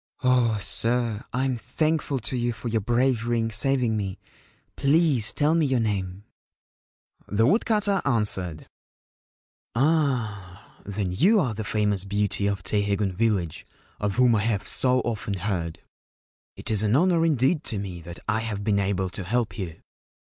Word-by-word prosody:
Oh, 125 -3 +3
sir, 115 +1 0
I 130 +1 0
am 130 -2 0
thankful 155 +2 -1
to 120 - -4
you 120 -1 0
for 120 - -6
your 110 -1 0
bravery 120 +1 +1
in 115 0 -1
saving 120 0 +2
me. 100 -3 -3 0.6
Please 140 -6 +2
tell 150 +2 +2
me 165 -3 +2
your 130 -2 +1
name/ 100 -3 -2 1.0
The 105 +2 +2
woodcutter 205 - +2
answered: 95 - 0 1.1
'Ah, 115 - -1
then, 100 -2 -3
you 190 - +4
are 125 - 0
the 110 +1 -4
famous 105 -2 +1
beauty 100 0 0
of 100 -3 -2
Teiheigun 100 -1 0
village, 95 -6 -1 0.4
of 105 -1 -1
whom 125 -2 +4
I 105 - +2
have 110 -3 -1
so 130 0 +1
often 105 -3 -3
heard! 90 -4 -3 0.7
It - - -4
is 105 -2 +2
an 110 +2 +2
honour 170 +2 +3
indeed 150 0 +2
to 110 - 0
me 95 -3 -5
that 85 +1 -9
I 110 +1 +1
have 110 -3 -4
been 100 -1 +2
able 95 -2 -1
to 95 +1 -5
help 110 0 -1
you. 85 -5 -6
110 Hz, 155 wpm, -25 LUFS, 100-130 Hz, 1.1 s, you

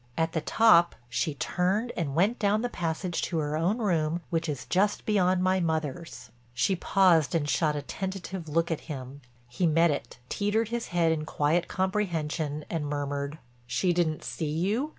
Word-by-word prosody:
At 160 0 +1
the 160 - -1
top 175 -2 +5
she 145 +5 -1
turned 190 - 0
and 145 -5 -2
went 200 +8 +2
down 210 +2 +2
the 245 - 0
passage 170 -2 -2
to 170 - -2
her 150 -1 -1
own 175 +8 +1
room 170 -6 0
which 165 -1 0
is 140 -4 -4
just 205 +3 +1
beyond 185 -3 +2
my 185 0 +3
mother's." 155 -6 -3 0.2
She 155 +11 +2
paused 175 -4 +3
and 150 -3 +1
shot 150 +3 +1
a 145 - -3
tentative 190 0 -5
look 165 +2 +1
at 165 - -2
him. 135 -1 -7 0.3
He 145 +9 0
met 165 +1 +4
it, 120 -4 -5
teetered 210 - 0
his 235 0 -3
head 170 -2 +2
in 155 -1 -1
quiet 155 +3 +1
comprehension 165 -6 -1
and 160 -3 -3
murmured: 145 0 -3 0.3
"She 175 +9 +1
didn't 165 -3 0
see 155 -3 -3
you?" 200 - 0
165 Hz, 175 wpm, -28 LUFS, 150-190 Hz, 0.3 s, top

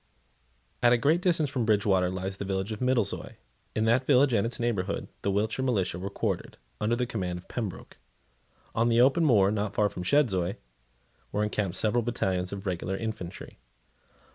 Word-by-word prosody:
At 120 0 +6
a - - +5
greater 155 +8 +2
distance 165 -6 +1
from 130 -4 -1
Bridgewater 100 -4 +2
lies 95 +1 -4
the - - -4
village 95 +1 -2
of 110 - -4
Middlezoy. 125 -5 0 0.4
In 110 - +1
that 120 +3 +2
village 135 -1 +5
and 105 0 +2
its 120 - -6
neighbourhood, 105 -5 -1
the 100 - -1
Wiltshire 105 +6 0
militia 95 -9 0
were 95 +2 -4
quartered, - - -3 0.2
under 115 +3 +1
the 125 +1 0
command 90 -7 -3
of 90 - -12
Pembroke. 110 -7 -6 0.8
On 115 +1 +2
the 115 0 +3
open 135 +7 +5
moor, 105 -9 +5
not 105 -1 -2
far 105 -1 +3
from 90 - -7
Chedzoy, 95 -6 +2 0.8
were 105 +1 0
encamped 105 -3 -1
several 110 +2 +2
battalions 95 -6 -1
of 100 0 -6
regular 95 +1 -2
infantry. 110 -6 -6
105 Hz, 175 wpm, -28 LUFS, 95-120 Hz, 0.8 s, At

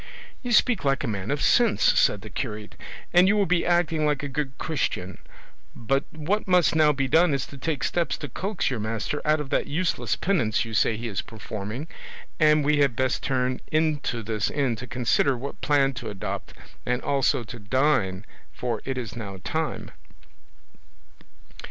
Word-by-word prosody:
"You 245 - -4
speak 230 -3 +4
like 135 -1 +1
a - - -1
man 100 -3 -3
of 145 0 -1
sense," 235 -3 +3 0.2
said 105 - +3
the 110 - -10
curate, 105 -3 -5 0.4
"and 180 +1 +6
you 210 +2 +3
will 205 - +3
be 175 -1 +2
acting 175 -3 +2
like 150 -2 +1
a - - -2
good 135 -1 -4
Christian; 95 - -2 0.6
but 135 +4 0
what 170 +8 -2
must 180 -3 +4
now 155 -1 +5
be 135 -1 -1
done 160 +2 +4
is 135 - -2
to 140 - -12
take 150 -7 -2
steps 175 -1 0
to 145 - -6
coax 190 - -2
your 125 - -2
master 110 +6 -3
out 155 +1 +2
of 145 -3 -6
that - - +1
useless 165 +4 0
penance 130 - +1
you 115 - -7
say 110 +2 +2
he 115 +2 -4
is 100 -4 -2
performing; 110 +5 -6 0.5
and 150 -2 +4
we 150 0 +3
had 140 -5 +3
best 130 0 0
turn 130 -1 -1
into 150 -7 0
this 110 -1 -1
inn 135 -5 0
to 130 - -7
consider 125 +2 +1
what 140 +4 -7
plan 140 -2 +3
to - - -6
adopt, 100 -2 -5 0.3
and 125 +1 -1
also 135 -2 +1
to 115 +2 -9
dine, 105 -4 +1 0.3
for 120 -4 -3
it 135 -1 -3
is 115 -6 -5
now 100 -5 -6
time." 160 -1 -3
135 Hz, 180 wpm, -25 LUFS, 115-155 Hz, 0.6 s, and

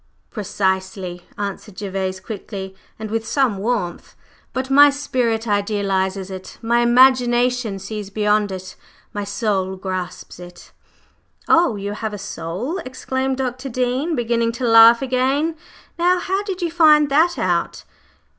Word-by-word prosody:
"Precisely," 190 -3 -3
answered 205 0 -6
Gervase 190 -2 -3
quickly 190 -2 -7 0.2
and 220 -1 -7
with 225 0 -1
some 255 -8 +1
warmth; 205 -5 -3 0.4
"but 260 +1 -3
my 290 +1 +8
spirit 245 -5 -1
idealizes 195 -2 -1
it, 185 0 -9
my 235 +1 +1
imagination 245 -2 +3
sees 200 +1 -6
beyond 210 0 +1
it, 185 0 -7 0.4
my 205 - -3
soul 200 -2 -1
grasps 185 -2 -6
it." 175 0 -13 0.8
"Oh, 330 -8 +4
you 200 0 -4
have 215 0 -4
a - - -6
soul?" 195 - -5
exclaimed 260 -2 -3
Dr. 255 0 -3
Dean, 255 +6 -1
beginning 235 -1 0
to 245 +2 -3
laugh 230 +2 +7
again. 270 +5 0 0.4
"Now, 355 +2 +3
how 380 +2 -1
did 385 -3 -5
you 340 - -1
find 305 -3 +5
that 325 +5 +3
out?" 175 -2 -1
225 Hz, 135 wpm, -20 LUFS, 195-260 Hz, 0.8 s, my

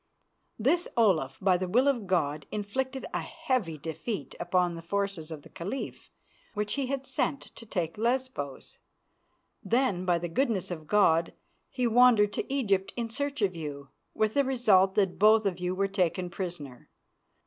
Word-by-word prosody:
This 310 +10 +2
Olaf, 170 - +3
by 185 -2 +3
the 185 +1 -3
will 250 +9 +3
of 240 -8 +1
God, 150 -5 0
inflicted 260 +6 -3
a - - 0
heavy 205 - -2
defeat 165 - -5
upon 175 0 +1
the 165 - -7
forces 195 -2 -2
of 155 -3 -8
the - - -14
Caliph 200 +11 -6 0.5
which 210 0 -1
he 275 -2 -1
had 270 0 -3
sent 270 +2 -1
to 230 - -12
take 175 -2 -3
Lesbos. 240 - -2 0.8
Then, 225 -4 +1
by 175 -2 +3
the 175 +1 -3
goodness 210 0 0
of 155 -3 -6
God, 170 -5 +3 0.4
he 255 -2 -1
wandered 230 -3 +5
to - - -4
Egypt 200 -9 +1
in 230 -2 -3
search 285 -1 -2
of 185 -3 +1
you, 145 -3 -6 0.3
with 215 0 +1
the 280 - +3
result 215 -8 +3
that 195 -3 +1
both 215 +1 +6
of 185 -3 -1
you 180 +1 -1
were 195 +1 +1
taken 185 -2 -1
prisoner. 170 -9 -6
200 Hz, 165 wpm, -29 LUFS, 175-245 Hz, 0.8 s, both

